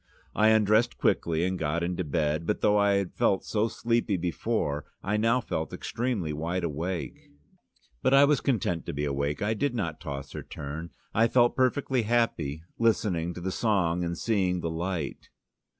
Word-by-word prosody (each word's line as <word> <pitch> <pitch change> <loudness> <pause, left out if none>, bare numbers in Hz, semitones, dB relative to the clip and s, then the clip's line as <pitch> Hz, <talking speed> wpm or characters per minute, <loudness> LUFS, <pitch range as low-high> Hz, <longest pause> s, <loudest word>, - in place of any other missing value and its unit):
I 110 - +4
undressed 110 +2 +4
quickly, 80 -1 +1
and 95 0 -2
got 80 +2 -1
into 90 +1 -1
bed, 75 +2 -1
but - - 0
though 105 - +4
I 100 0 +4
had 100 -2 0
felt 95 - +1
so 110 +1 +1
sleepy 115 -3 0
before, 85 -4 -1 0.2
I 100 +2 0
now 115 +4 +2
felt 80 -7 -3
extremely 110 -10 -2
wide 85 +4 -2
awake. 85 +3 -4 0.7
But - - +2
I 140 +1 +8
was 145 -2 +2
quite 135 - +2
content 90 -6 -2
to - - -3
be 75 +1 -2
awake: 70 +4 -1
I 105 +2 +1
did 125 +4 -1
not 85 -8 -2
toss 70 -4 -6
or - - -5
turn, 80 +4 -7 0.2
I 115 +2 +4
felt 120 0 +3
perfectly 130 0 +1
happy 110 -10 0 0.2
listening 95 -7 +1
to 90 - -7
the 95 +2 -2
song 90 -6 +1
and 85 0 -2
seeing 95 -5 0
the 85 - -2
light. 85 -2 -4
90 Hz, 180 wpm, -28 LUFS, 80-110 Hz, 0.7 s, I